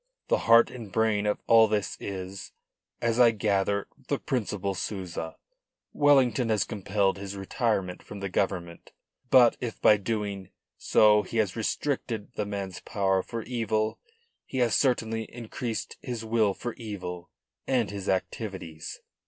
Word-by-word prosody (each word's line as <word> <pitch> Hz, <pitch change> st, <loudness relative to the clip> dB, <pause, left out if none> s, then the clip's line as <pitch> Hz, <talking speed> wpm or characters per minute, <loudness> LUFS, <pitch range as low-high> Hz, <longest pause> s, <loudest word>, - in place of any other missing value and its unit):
The -, -, +3 dB
heart 115 Hz, 0 st, +7 dB
and 115 Hz, -6 st, -9 dB
brain 105 Hz, -1 st, +1 dB
of 105 Hz, -, -1 dB
all 115 Hz, -1 st, +7 dB
this 105 Hz, -1 st, -1 dB
is 95 Hz, 0 st, -6 dB, 0.5 s
as 115 Hz, 0 st, +1 dB
I 120 Hz, -1 st, +8 dB
gather 100 Hz, -2 st, 0 dB, 0.2 s
the -, -, 0 dB
Principal 105 Hz, -6 st, -2 dB
Souza. 90 Hz, -3 st, -5 dB, 0.6 s
Wellington 135 Hz, -4 st, +4 dB
has 105 Hz, -4 st, +3 dB
compelled 100 Hz, -1 st, 0 dB
his 100 Hz, 0 st, -6 dB
retirement 95 Hz, -2 st, -1 dB
from 105 Hz, -, -9 dB
the 100 Hz, -, -3 dB
Government. 90 Hz, -3 st, -2 dB, 0.4 s
But 125 Hz, -3 st, +6 dB
if 120 Hz, -3 st, -5 dB
by 105 Hz, -, +6 dB
doing 100 Hz, -2 st, -3 dB, 0.3 s
so 105 Hz, -1 st, +5 dB
he 115 Hz, -, -5 dB
has 105 Hz, -5 st, +1 dB
restricted 115 Hz, -1 st, -2 dB
the 105 Hz, -2 st, -3 dB
man's 100 Hz, -3 st, -4 dB
power 95 Hz, -3 st, 0 dB
for 115 Hz, +3 st, -6 dB
evil, 110 Hz, -3 st, -1 dB, 0.5 s
he -, -, -5 dB
has 120 Hz, -3 st, +2 dB
certainly 115 Hz, -4 st, +1 dB
increased 115 Hz, 0 st, -5 dB
his 120 Hz, -3 st, -5 dB
will 110 Hz, -3 st, +2 dB
for 120 Hz, -1 st, -5 dB
evil 90 Hz, -6 st, -6 dB, 0.4 s
and 120 Hz, -6 st, +1 dB
his 100 Hz, -1 st, -5 dB
activities. 95 Hz, -4 st, -4 dB
105 Hz, 145 wpm, -28 LUFS, 95-115 Hz, 0.6 s, I